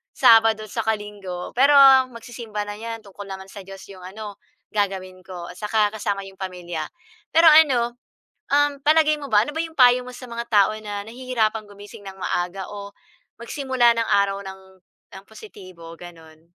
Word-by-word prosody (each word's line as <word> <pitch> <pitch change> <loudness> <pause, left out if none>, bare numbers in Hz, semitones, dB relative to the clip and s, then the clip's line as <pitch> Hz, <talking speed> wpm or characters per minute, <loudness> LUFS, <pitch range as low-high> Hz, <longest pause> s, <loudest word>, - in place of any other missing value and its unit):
Sabado 225 -1 +5
tsaka 220 -1 -1
Linggo, 200 -4 -8
pero 280 +2 +5 0.4
magsisimba 230 -2 -7
na 205 - -6
'yan 225 0 -7
tungkol 200 0 -11
naman 190 0 -8
sa 200 - -9
Diyos 195 0 -11
'yong 185 -2 -12
ano, 210 -2 -8 0.4
gagawin 190 -3 -3
ko 175 -2 -8
at - - -15
saka 210 0 +1
kasama 200 -2 -3
'yong 195 -1 -14
pamilya. 175 -4 -5 0.5
Pero 330 +1 +6
ano, 255 -6 +4 0.6
um, 290 0 +2
palagay 305 0 +4
mo - - -6
ba, 210 -1 +4
ano - - -6
ba 320 - 0
'yong 325 -1 -8
payo 250 -1 +6
mo 250 - -9
sa 255 - -10
mga 235 0 -5
tao 205 0 +4
na 205 -1 -5
nahihirapan 225 -3 -2
gumising 205 0 -13
ng 190 - -8
maaga 180 +1 -3
o 200 -1 -8 0.5
magsimula 245 -2 +1
ng 230 - 0
araw 200 0 +2
ng 190 0 -9 0.6
ng 190 - -13
positibo 185 -6 -13
gano'n? 165 -2 -14
210 Hz, 170 wpm, -22 LUFS, 190-235 Hz, 0.6 s, Pero